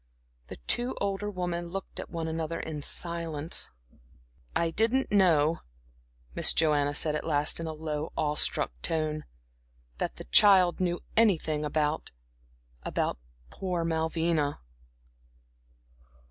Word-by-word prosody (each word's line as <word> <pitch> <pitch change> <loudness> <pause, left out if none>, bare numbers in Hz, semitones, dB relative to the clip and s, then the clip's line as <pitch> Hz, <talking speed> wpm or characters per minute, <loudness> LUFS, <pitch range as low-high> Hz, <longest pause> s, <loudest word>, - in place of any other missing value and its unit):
The - - -8
two 245 +1 +1
older 200 +1 -2
women 175 -3 -3
looked 195 +2 -6
at - - -6
one 165 -1 -4
another 160 0 -3
in 155 -2 -5
silence. 165 -1 +1 0.9
"I 165 -1 +1
didn't 230 +8 +1
know," 165 -6 +3 0.7
Miss - - +4
Joanna 145 -2 +2
said 150 0 +1
at 150 - -2
last 150 -1 +1
in 165 - -4
a 160 - -4
low, 155 0 -4
awe 150 -1 0
struck 150 - +2
tone 155 -1 -1 0.7
"that - - -2
the - - -9
child 190 -4 +6
knew 175 -1 -1
anything 165 -9 +2
about 150 +1 -1 0.7
about - - -2 0.3
poor 180 - -3
Malvina." 160 -2 0
165 Hz, 120 wpm, -28 LUFS, 155-180 Hz, 0.9 s, child